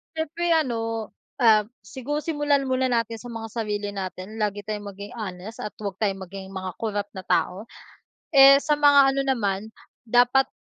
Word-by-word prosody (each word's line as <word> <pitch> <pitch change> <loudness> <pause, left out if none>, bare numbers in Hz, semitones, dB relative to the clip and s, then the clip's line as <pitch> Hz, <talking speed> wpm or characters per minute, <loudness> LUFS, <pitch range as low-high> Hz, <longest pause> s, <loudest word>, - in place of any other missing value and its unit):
Siyempre 325 +2 -2
ano, 225 -6 -1 0.3
ah, 215 -2 +5 0.2
siguro 275 +8 -4
simulan 290 -3 +1
muna 260 0 0
natin 230 -2 -1
sa 245 - -10
mga 225 -2 -7
sarili 210 -3 -3
natin 195 +2 -6
lagi 205 -1 -1
tayong 210 0 -5
maging 200 +1 -9
honest 210 -2 -7
at 210 - -6
'wag 200 -3 -6
tayong 195 -3 -1
maging 190 +1 -9
mga 185 -1 -4
corrupt 205 -2 -3
na 190 - -8
tao. 195 +5 0 0.7
Eh, 275 0 +9
sa 300 +1 +1
mga 285 -2 +5
ano 275 - 0
naman 220 -6 -1 0.3
dapat 245 +3 +3
225 Hz, 165 wpm, -24 LUFS, 205-270 Hz, 0.7 s, Eh